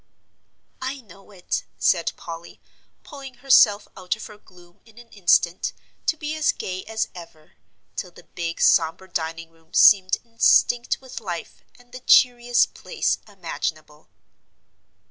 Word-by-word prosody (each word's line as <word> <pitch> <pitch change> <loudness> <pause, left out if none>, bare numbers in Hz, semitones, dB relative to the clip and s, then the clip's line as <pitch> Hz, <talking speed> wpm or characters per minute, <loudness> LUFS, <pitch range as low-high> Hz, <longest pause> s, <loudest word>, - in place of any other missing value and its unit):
"I 265 +1 -4
know 195 -3 -18
it," 185 -3 -4
said 170 -3 +1
Polly, 170 0 -10 0.4
pulling 275 -3 -11
herself 235 -5 +4
out 185 +1 -3
of 215 - -10
her 210 - -12
gloom 175 -3 -21
in 225 -1 -22
an 240 -1 -15
instant, 180 -3 +1 0.3
to 320 - +1
be 300 0 -4
as 310 -1 +2
gay 185 0 -6
as 220 0 -2
ever, 165 -3 -13 0.4
till 180 - -5
the 175 - -17
big 170 -1 -5
sombre 165 +3 +3
dining 165 -1 -5
room 165 0 -18
seemed 190 -2 +6
instinct 235 +1 +3
with 260 -1 -8
life, 175 -5 -7 0.2
and 245 -1 -22
the 255 - -9
cheeriest 245 -1 +4
place - - -2
imaginable. 160 -5 -6
195 Hz, 140 wpm, -23 LUFS, 170-240 Hz, 0.4 s, seemed